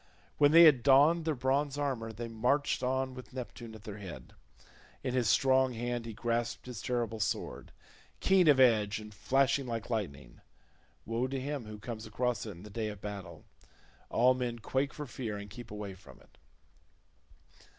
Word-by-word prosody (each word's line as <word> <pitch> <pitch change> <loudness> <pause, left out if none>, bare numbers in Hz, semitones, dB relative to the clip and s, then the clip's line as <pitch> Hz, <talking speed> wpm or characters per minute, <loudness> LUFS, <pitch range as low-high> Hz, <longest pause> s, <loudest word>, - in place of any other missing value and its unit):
When 145 - +7
they 165 +2 +9
had 150 -7 +7
donned 145 +6 +5
their 160 -2 0
bronze 135 +2 0
armour 130 -6 -2
they 115 +2 -6
marched 125 +6 0
on 130 +1 -1
with 130 0 -11
Neptune 120 -2 -7
at 110 - -13
their 105 -1 -7
head. 95 -4 -9 0.7
In 130 -2 -2
his 125 -5 +2
strong 130 +1 +4
hand 120 0 -3
he 115 - -6
grasped 120 +1 -2
his 125 -6 -7
terrible 120 -3 -2
sword, 90 - -3 0.5
keen 190 -3 +4
of 145 -3 +6
edge 110 -5 +4
and 105 0 -9
flashing 135 +4 +1
like 115 0 -4
lightning; 80 - -4 0.6
woe 115 +3 -1
to 135 0 -3
him 140 -2 -4
who 105 0 -8
comes 110 +1 -7
across 120 0 -1
it - - -4
in 90 -2 -10
the 105 - -11
day 110 +1 -2
of 105 -2 -6
battle; 95 -5 -8 0.6
all 125 +2 +4
men 125 -2 -3
quake 135 +4 -1
for 150 - -6
fear 120 -5 -5
and 100 0 -9
keep 120 +1 -9
away 105 -2 -6
from 95 - -15
it. - - -24
120 Hz, 180 wpm, -31 LUFS, 110-130 Hz, 0.7 s, they